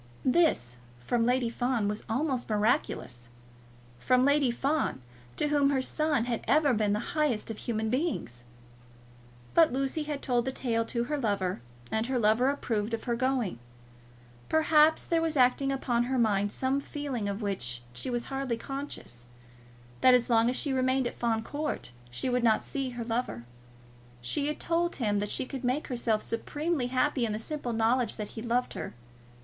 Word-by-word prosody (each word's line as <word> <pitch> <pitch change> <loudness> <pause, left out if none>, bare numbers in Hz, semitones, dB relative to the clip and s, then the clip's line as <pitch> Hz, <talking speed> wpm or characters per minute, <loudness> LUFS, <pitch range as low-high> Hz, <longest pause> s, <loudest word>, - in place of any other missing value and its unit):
This, 255 - +2 0.2
from 230 - 0
Lady 245 -1 +1
Fawn, 245 -3 0
was 210 +1 -3
almost 255 +1 -1
miraculous, 210 - 0 0.7
from 255 - +3
Lady 285 -2 +4
Fawn, 275 - 0 0.4
to 295 - +1
whom 290 -1 +3
her 270 -2 +1
son 300 -4 +1
had 240 -2 -2
ever 290 -2 +4
been 210 -2 +1
the 210 +3 -3
highest 290 -9 0
of 220 - -6
human 220 -2 -2
beings! 255 - -2 1.1
But 330 -2 +6
Lucy 270 +4 -1
had 295 -1 -4
told 245 -2 +1
the 265 - -1
tale 230 -3 -1
to 235 +1 -1
her 295 +4 -2
lover, 195 - -1 0.3
and 220 +1 0
her 260 -1 0
lover 230 +3 +3
approved 230 -5 -1
of 225 - -10
her 240 -2 -1
going. 250 - 0 0.9
Perhaps 315 0 +4
there 330 -1 +1
was 320 -2 -1
acting 260 +2 +3
upon 240 -3 0
her 260 +1 -1
mind 205 -3 +2
some 265 +4 0
feeling, 275 -9 -4
of 200 +2 -4
which 125 -12 -2
she 255 - -3
was 240 -1 -2
hardly 270 -3 -2
conscious, 270 - -7 0.7
that 255 -1 +7
as 245 0 +1
long 230 0 +4
as 250 - -1
she 280 0 0
remained 260 0 +2
at 240 - -4
Fawn 225 -2 0
Court 295 - -4 0.2
she 120 - -3
would 250 -1 +1
not 220 -2 +3
see 275 -2 -3
her 240 -1 -5
lover. 225 - -2 0.7
She 200 - -1
had 300 - -3
told 340 +1 0
him 210 -5 0
that 205 0 -2
she - - 0
could 265 0 -6
make 255 +5 -1
herself 235 -4 0
supremely 290 +4 -2
happy 260 +1 +1
in 220 -2 0
the - - -2
simple 250 +2 -4
knowledge 230 +2 +1
that 210 -2 -5
he 220 - -7
loved 245 +2 0
her. - - -6
245 Hz, 175 wpm, -29 LUFS, 220-275 Hz, 1.1 s, that